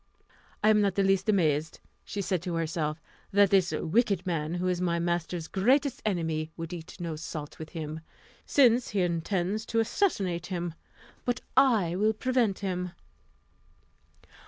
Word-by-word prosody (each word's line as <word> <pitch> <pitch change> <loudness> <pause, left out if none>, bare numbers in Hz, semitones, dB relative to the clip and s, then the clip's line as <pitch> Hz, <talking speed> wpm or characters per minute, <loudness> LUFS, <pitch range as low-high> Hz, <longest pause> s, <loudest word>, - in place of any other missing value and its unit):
"I 215 - +6
am 210 -1 +5
not 200 -2 +1
in 195 - +3
the - - +3
least 195 +2 +1
amazed," 160 -6 +1 0.3
said 200 - -4
she 185 0 +1
to 175 +1 -4
herself, 160 -1 -1 0.3
"that 200 -1 +5
this 185 -4 +4
wicked 185 +4 +1
man, 165 -2 -1
who 180 +1 -1
is 180 -1 0
my 170 -2 +1
master's 170 -1 -2
greatest 260 +7 +2
enemy, 160 -5 -1
would 165 +1 -5
eat 165 -1 -9
no 170 -2 -3
salt 155 -1 -7
with 160 -1 -7
him, 155 -1 -5 0.4
since 245 -3 +4
he 200 -2 0
intends 180 +4 -1
to 230 - +1
assassinate 195 - 0
him; 175 -2 -3 0.5
but 245 0 -1
I 225 -11 +4
will 215 +3 +2
prevent 240 -3 +1
him." 180 -1 -2
180 Hz, 160 wpm, -28 LUFS, 165-210 Hz, 0.5 s, I